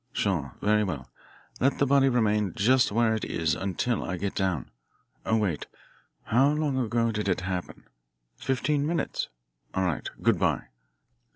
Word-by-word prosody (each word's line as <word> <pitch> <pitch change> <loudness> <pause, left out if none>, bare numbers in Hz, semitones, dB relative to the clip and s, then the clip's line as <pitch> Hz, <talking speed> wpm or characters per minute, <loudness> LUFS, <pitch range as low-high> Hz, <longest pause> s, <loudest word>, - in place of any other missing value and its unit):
Sure. 80 - -1
Very 105 +1 +3
well. 75 -10 -4 0.5
Let 135 +3 +2
the 140 - +3
body 135 0 +4
remain 105 -6 +1
just 125 +4 +4
where 115 +1 +3
it 110 - -2
is 80 -1 0
until 100 +5 -1
I 90 - -3
get 100 +2 -2
down. 95 -9 -1 0.6
Oh, 110 - +3
wait. 95 -9 -1 0.6
How 130 +5 +4
long 150 -3 0
ago 115 -1 +1
did 105 -2 -2
it 90 - +1
happen? 90 -1 -4 0.5
Fifteen 140 - 0
minutes? 170 +1 -1 0.5
All 95 - +1
right. 85 -5 -2
Good - - +3
bye." - - 0
105 Hz, 155 wpm, -27 LUFS, 95-125 Hz, 0.6 s, body